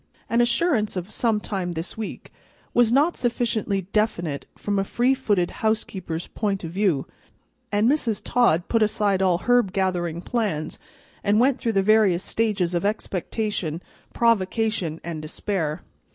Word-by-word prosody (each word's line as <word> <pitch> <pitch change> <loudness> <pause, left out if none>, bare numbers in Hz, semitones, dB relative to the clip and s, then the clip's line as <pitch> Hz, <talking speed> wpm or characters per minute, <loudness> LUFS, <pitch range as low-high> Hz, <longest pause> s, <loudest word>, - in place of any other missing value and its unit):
An 235 +1 +4
assurance 240 - +2
of 180 +3 -4
"some 225 -2 +1
time 190 -4 -3
this 165 +2 -5
week" 220 -2 -7 0.4
was 240 -2 +4
not 295 +7 +3
sufficiently 230 -5 0
definite 175 -9 0
from 205 -1 -1
a - - +2
free 245 +6 +2
footed 205 -9 0
housekeeper's 190 -6 -1
point 200 -3 -2
of 165 - -5
view, 185 -7 +1 0.7
and 205 +2 +3
Mrs. 240 -7 +1
Todd 180 -9 +2
put 230 - +1
aside 210 -2 +2
all 185 -2 +3
herb 245 0 +2
gathering 175 -3 -1
plans, 185 -11 -2 0.4
and 205 +2 +3
went 260 +2 +3
through 230 -2 -1
the 195 -1 +2
various 205 -4 +4
stages 205 -6 0
of 175 - 0
expectation, 200 -4 -2 0.3
provocation, 215 -6 +1
and 165 -2 -5
despair. 155 0 -3
205 Hz, 145 wpm, -24 LUFS, 175-225 Hz, 0.7 s, An